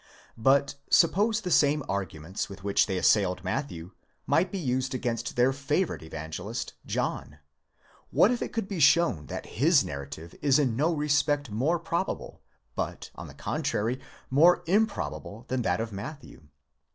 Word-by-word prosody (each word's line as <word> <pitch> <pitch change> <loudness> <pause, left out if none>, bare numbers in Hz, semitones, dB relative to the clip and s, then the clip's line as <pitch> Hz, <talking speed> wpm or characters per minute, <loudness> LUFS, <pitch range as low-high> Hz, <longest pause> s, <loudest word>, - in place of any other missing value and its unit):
But 140 +4 +3 0.2
suppose 210 +6 +4
the 180 -3 -4
same 145 -1 +4
arguments 95 -2 -4
with 95 -1 -10
which 100 -1 +2
they 95 -3 -1
assailed 90 -1 +2
Matthew 95 - -4 0.3
might 180 +2 +2
be 200 - -3
used 130 -5 -1
against 120 -2 -3
their 125 +2 +3
favourite 145 +6 -1
evangelist 80 +8 -6
John 75 - -3
αὶ - - -29 0.7
What 215 - +4
if 245 - -1
it - - -3
could 225 -4 -2
be 195 -4 -4
shown 140 - +4
that - - -6
his 145 - +3
narrative 75 +1 -7
is 140 -2 +4
in 130 -6 +1
no 155 +7 +2
respect 145 -3 +1
more 135 +11 +1
probable, 170 +3 -3 0.3
but, - - -4
on - - -9
the - - -12
contrary, 115 +5 -2 0.3
more 165 +6 +5
improbable, 190 - -1
than 130 0 0
that 90 -4 0
of 115 0 -3
Matthew? 110 - -9
130 Hz, 155 wpm, -28 LUFS, 100-160 Hz, 0.7 s, more